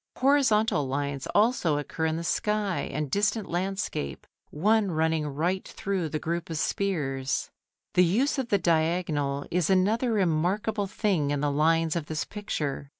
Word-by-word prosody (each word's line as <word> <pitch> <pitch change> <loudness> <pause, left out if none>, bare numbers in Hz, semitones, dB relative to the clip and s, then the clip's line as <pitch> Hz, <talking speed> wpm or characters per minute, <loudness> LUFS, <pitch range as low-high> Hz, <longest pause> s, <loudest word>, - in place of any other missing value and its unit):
Horizontal 225 - +3
lines 140 0 -3
also 205 - +3
occur 160 +2 -2
in 160 0 -1
the 165 - -4
sky 210 +2 -1
and 150 -1 -3
distant 210 +1 +1
landscape, 185 - -3 0.2
one 210 +6 +2
running 160 -2 0
right 170 +7 -1
through 190 -5 -3
the 155 - -2
group 170 +3 -3
of 165 - -3
spears. 140 -8 -1 0.4
The 180 - +5
use 245 - +2
of 250 -3 -3
the 200 - +4
diagonal 160 -5 0
is 175 -1 +1
another 210 +6 +2
remarkable 200 +3 0
thing 190 -8 0
in 145 0 0
the 145 -1 +1
lines 160 +2 +2
of 165 -3 -3
this 155 -1 -2
picture. 150 -9 -4
170 Hz, 150 wpm, -27 LUFS, 150-205 Hz, 0.4 s, The